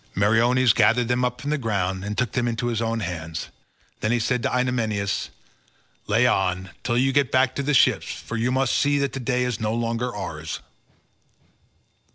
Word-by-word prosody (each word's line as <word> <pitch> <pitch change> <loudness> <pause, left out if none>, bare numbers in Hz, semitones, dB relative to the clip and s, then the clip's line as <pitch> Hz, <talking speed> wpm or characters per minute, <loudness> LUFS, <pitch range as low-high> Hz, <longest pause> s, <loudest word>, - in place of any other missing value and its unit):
Meriones 115 +4 +4
gathered 120 +1 +3
them 125 +1 +1
up 125 0 -1
from 145 +3 -3
the 150 - 0
ground 95 -5 -1
and 105 +1 -4
took 125 -4 0
them 120 -1 0
into 120 +1 -2
his 115 -1 -1
own 115 0 -1
hands, 80 -3 -5 0.5
then 110 - 0
he 120 - +3
said 120 +2 0
to - - 0
Idomeneus, 115 -6 -1 0.8
"Lay 115 +4 +3
on, 95 -5 0
till 120 -1 0
you 135 +2 +2
get 140 -4 +2
back 130 0 +3
to - - -3
the 145 +1 +1
ships, - - +3
for 115 - -7
you 115 +2 0
must 130 0 +1
see 145 0 +2
that 140 -1 -1
the 135 - -4
day 125 0 0
is 125 -2 -2
no 110 0 -1
longer 115 +1 -1
ours." - - -5
120 Hz, 195 wpm, -24 LUFS, 105-125 Hz, 0.8 s, Meriones